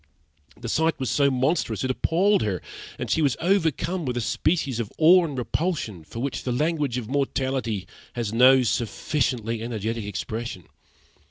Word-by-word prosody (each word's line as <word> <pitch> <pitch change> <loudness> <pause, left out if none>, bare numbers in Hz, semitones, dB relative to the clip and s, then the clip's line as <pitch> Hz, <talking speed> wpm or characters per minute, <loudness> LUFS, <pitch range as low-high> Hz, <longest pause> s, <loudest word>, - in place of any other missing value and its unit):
The - - -6
sight 160 -1 +1
was 130 -4 -1
so 140 +3 +3
monstrous 130 - 0
it 130 - +1
appalled 185 +10 +2
her; 100 -5 -1 0.4
and - - -4
she 160 - +1
was 140 -4 +2
overcome 175 -1 +1
with 125 -3 -2
a - - +1
species 140 +1 0
of 110 -3 -3
awe 175 +3 +7
and 145 -5 -5
repulsion, 125 - -2
for 80 - -11
which 140 0 -2
the 125 - -3
language 145 -1 0
of 120 -4 -4
mortality 130 -6 -1 0.3
has 115 -3 -3
no 130 +2 +6
sufficiently 115 -1 -1
energetic 115 -1 -3
expression. 105 0 -5
130 Hz, 160 wpm, -25 LUFS, 115-155 Hz, 0.4 s, awe